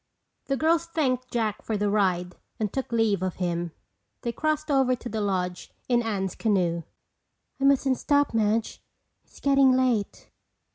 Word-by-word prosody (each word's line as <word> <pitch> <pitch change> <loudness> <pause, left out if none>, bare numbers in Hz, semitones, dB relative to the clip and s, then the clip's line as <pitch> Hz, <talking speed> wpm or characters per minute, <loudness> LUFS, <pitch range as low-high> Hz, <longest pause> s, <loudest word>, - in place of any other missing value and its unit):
The 275 - -1
girls 330 +2 +2
thanked 255 -6 -1
Jack 220 -3 -1
for 220 - -2
the 205 0 0
ride 185 -3 +1 0.2
and 210 -3 -2
took 265 -2 -3
leave 225 -5 +2
of 185 -1 -2
him. 175 -2 -2 0.5
They 235 - -1
crossed 310 +3 -1
over 265 -2 +3
to 245 0 -8
the 220 0 -2
lodge 180 -3 -2 0.2
in 240 -1 +3
Anne's 195 -5 -2
canoe. 180 -6 +1 0.8
"I 275 - +1
mustn't 275 -1 +3
stop, 285 -2 +2
Madge. 220 0 0 0.4
It's - - -18
getting 275 -2 +4
late." 250 -5 0
225 Hz, 155 wpm, -26 LUFS, 195-270 Hz, 0.8 s, getting